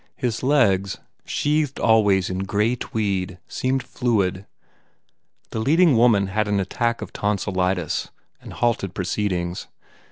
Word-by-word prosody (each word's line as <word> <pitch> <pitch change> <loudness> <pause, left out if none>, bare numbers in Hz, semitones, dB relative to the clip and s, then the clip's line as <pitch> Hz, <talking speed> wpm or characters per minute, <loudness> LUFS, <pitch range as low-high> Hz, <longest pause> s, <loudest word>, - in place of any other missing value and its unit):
His 120 -4 -2
legs, 105 -9 +2 0.3
sheathed 150 -1 0
always 105 -5 +3
in 95 - -3
grey 105 +5 0
tweed, 100 -6 -2
seemed 130 0 -1
fluid. 100 -6 -1 1.0
The - - -3
leading 155 +5 +4
woman 115 -4 +4
had 105 +3 -1
an 100 -1 +1
attack 115 +5 -1
of - - -10
ton 105 0 0
silitis 90 -3 -1 0.3
and - - -10
halted 115 -6 -1
proceedings. 90 -2 -2
105 Hz, 125 wpm, -23 LUFS, 95-120 Hz, 1.0 s, leading